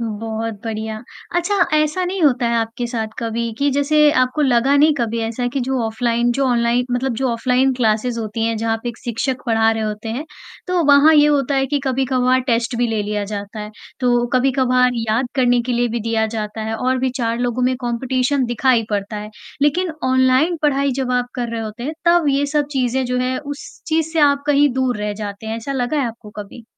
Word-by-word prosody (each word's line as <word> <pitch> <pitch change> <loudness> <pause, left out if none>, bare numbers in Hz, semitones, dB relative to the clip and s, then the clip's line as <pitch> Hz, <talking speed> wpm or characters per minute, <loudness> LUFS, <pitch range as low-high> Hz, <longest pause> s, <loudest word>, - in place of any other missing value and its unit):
बहुत 225 0 -4
बढ़िया। 220 -1 -4 0.4
अच्छा, 350 +4 0 0.2
ऐसा 305 +4 +1
नहीं 365 0 -3
होता 260 -5 +3
है 235 - 0
आपके 230 +1 -2
साथ 225 -2 -3
कभी 230 0 -2
कि 285 0 +2
जैसे 295 +2 +3
आपको 255 +4 +1
लगा 265 +1 +3
नहीं 300 +2 +5
कभी 230 -1 -1
ऐसा 230 +2 -2
कि 275 - 0
जो 260 +1 -1
ऑफ़लाइन 235 +2 0
जो 275 +3 0
ऑनलाइ 240 0 +2
मतलब 245 +1 -1
जो 265 +2 0
ऑफ़लाइन 255 +3 +2
क्लासेज 235 0 0
होती 225 0 -3
हैं, 230 0 -1
जहाँ 225 +1 0
पे 240 - -3
एक 235 - -7
शिक्षक 250 +2 -3
पढ़ा 225 -1 +3
रहे 225 0 -1
होते 215 +1 -4
हैं, 245 +7 -3 0.4
तो 365 -2 +1
वहाँ 285 +2 +6
ये 295 -1 +6
होता 285 -2 +1
है 270 0 +1
कि 290 +2 0
कभी-कभार 255 -1 +1
टेस्ट 235 0 0
भी 245 - +2
ले 220 -2 -1
लिया 210 0 -2
जाता 205 +1 -6
है, 210 0 -7 0.3
तो 240 -1 +2
कभी-कभार 255 -1 +3 0.2
याद 230 +4 +1
करने 245 -2 +3
के 250 +1 -2
लिए 240 0 +1
भी 235 +1 -3
दिया 225 0 0
जाता 215 -1 -5
है 220 +1 -3
और 255 +2 0
भी 260 0 0
4 230 0 -1
लोगों 245 0 -1
में 255 +1 +2
कॉम्पिटिशन 255 +2 0
दिखाई 240 0 +2
पड़ता 205 +1 -2
है, 210 0 -7 0.3
लेकिन 330 +4 +1
ऑनलाइन 260 +6 +3
पढ़ाई 280 -1 +2
जब 250 -1 -2
आप 250 0 +1
कर 245 -2 -3
रहे 230 - -3
होते 220 +2 -7
हैं, 300 - -3
तब 340 -3 +4
ये 280 +1 +1
सब 295 0 0
चीज़ें 260 -1 0
जो 250 0 -1
हैं 255 +1 -1
उस 290 0 -9
चीज़ 320 0 0
से 325 - +1
आप 280 -1 +4
कहीं 290 0 +4
दूर 255 -1 0
रह 210 0 -1
जाते 205 +1 -6
हैं, 220 +1 -3
ऐसा 230 +5 -5
लगा 260 +2 -1
है 265 - 0
आपको 230 -2 -9
कभी? 210 +3 -9
245 Hz, 215 wpm, -19 LUFS, 225-275 Hz, 0.4 s, वहाँ